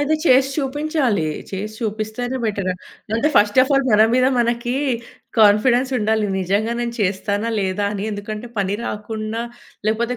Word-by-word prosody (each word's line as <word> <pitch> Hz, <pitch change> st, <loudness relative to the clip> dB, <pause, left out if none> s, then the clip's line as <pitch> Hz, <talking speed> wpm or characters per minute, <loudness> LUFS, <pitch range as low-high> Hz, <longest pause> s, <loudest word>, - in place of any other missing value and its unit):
అయితే 290 Hz, +2 st, +2 dB
చేషి 265 Hz, -1 st, +5 dB
చూపించాలి. 285 Hz, -, 0 dB, 0.3 s
చేసి 210 Hz, +3 st, -5 dB
చూపిస్తేనే 220 Hz, +4 st, -3 dB
బెటర. 200 Hz, -3 st, -1 dB, 0.4 s
లేపోతే, 230 Hz, +7 st, +2 dB
ఫస్ట్ 205 Hz, +4 st, +4 dB
ఆఫ్ 265 Hz, -, -1 dB
ఆల్ 275 Hz, -1 st, +3 dB
మన 215 Hz, 0 st, +6 dB
మీద 255 Hz, 0 st, +4 dB
మనకీ 240 Hz, +1 st, 0 dB, 0.6 s
కాన్ఫిడెన్సుండాలి, 220 Hz, 0 st, +3 dB
నిజంగా 200 Hz, +5 st, 0 dB
నేను 235 Hz, 0 st, -3 dB
చేస్తానా, 200 Hz, +3 st, 0 dB
లేదా 190 Hz, +1 st, -1 dB
అని. 200 Hz, 0 st, -3 dB
ఎందుకంటే, 215 Hz, +3 st, -6 dB
పని 195 Hz, 0 st, 0 dB
రాకుండా 215 Hz, +2 st, -4 dB, 0.4 s
లేకపోతే 235 Hz, +3 st, 0 dB
220 Hz, 135 wpm, -20 LUFS, 205-250 Hz, 0.6 s, మన